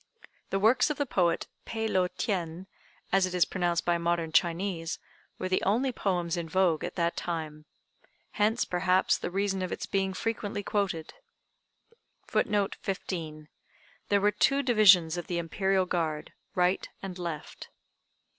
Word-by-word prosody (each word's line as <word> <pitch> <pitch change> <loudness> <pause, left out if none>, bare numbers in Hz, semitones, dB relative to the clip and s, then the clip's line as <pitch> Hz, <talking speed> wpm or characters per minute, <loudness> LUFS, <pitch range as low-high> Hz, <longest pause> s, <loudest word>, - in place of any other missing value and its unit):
The 195 - 0
works 225 +8 +4
of 300 - -2
the 285 - 0
poet 175 -9 +1 0.2
Peh 225 -1 -3
lo 185 -4 +2
tien, 180 -2 -3 0.5
as 195 -1 +4
it 180 - -5
is 180 - +4
pronounced 175 -2 -1
by 175 -1 +2
modern 170 -1 0
Chinese, 170 0 0 0.4
were 185 - -3
the 185 0 +1
only 245 +7 +1
poems 180 -7 -1
in 165 -1 -4
vogue 180 -2 +2
at - - -4
that 170 -1 0
time. 155 -3 -4 0.7
Hence, 220 +3 +1
perhaps, 180 +1 +2
the - - -3
reason 195 +1 -1
of 185 - -3
its - - -3
being 195 -1 -1
frequently 215 -1 -3
quoted.] 195 -6 -2 1.1
[Footnote 205 -2 0
15: 160 -6 -4 0.6
There 200 -1 +3
were 205 +1 +4
two 275 +6 +2
divisions 185 -9 +6
of 175 - -5
the 175 - -2
Imperial 190 +3 +1
guard, 160 -4 -2 0.2
right 180 +1 +1
and 185 -2 -6
left. 170 -4 -6
185 Hz, 150 wpm, -29 LUFS, 170-200 Hz, 1.1 s, divisions